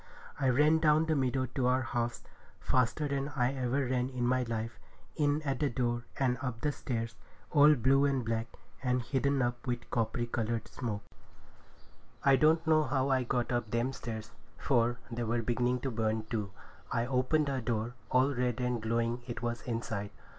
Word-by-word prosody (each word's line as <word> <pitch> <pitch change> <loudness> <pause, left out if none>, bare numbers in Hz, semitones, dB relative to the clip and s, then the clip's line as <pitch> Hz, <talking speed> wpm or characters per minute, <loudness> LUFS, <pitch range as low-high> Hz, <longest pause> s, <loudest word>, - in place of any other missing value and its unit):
I 135 -2 +2
ran 150 +5 +4
down 155 0 +4
the 160 -1 +1
meadow 130 -1 +1
to 130 -2 +1
our 130 +1 +2
house 120 0 -2 0.4
faster 130 +4 +1
than 140 0 -1
I 125 0 +2
ever 130 +1 0
ran 125 0 0
in 125 -2 -2
my 130 +1 +2
life, 115 -1 -3 0.4
in 150 0 +1
at 135 -3 -1
the 145 - +2
door, 120 -1 -1
and 125 -3 +1
up 120 -3 -4
the 150 - +1
stairs, 115 -5 -3 0.4
all 150 0 +7
blue 135 +3 +4
and 135 -4 +1
black, 115 0 -1 0.3
and 125 -2 +1
hidden 135 +1 +1
up 120 +1 -3
with 120 -1 -3
coppery 115 +1 0
coloured 115 -1 -2
smoke. 110 -5 -4 1.2
I 135 -1 +7
don't 160 +4 +4
know 155 0 +5
how 135 -1 0
I 130 -1 +3
got 120 0 -1
up 120 -3 -1
them 120 +4 0
stairs, 110 -3 -6 0.3
for 120 -2 +2
they 120 +1 -3
were 115 +1 0
beginning 120 +2 0
to 135 - -2
burn 110 -1 0
too. 105 -3 -1 0.4
I 115 - +1
opened 130 +4 +1
her 135 -2 -1
door—all 120 +4 0
red 125 -1 -1
and 125 -2 -1
glowing 115 +2 0
it 120 -1 -5
was 120 0 -2
inside! 115 -3 -3
125 Hz, 180 wpm, -31 LUFS, 115-135 Hz, 1.2 s, all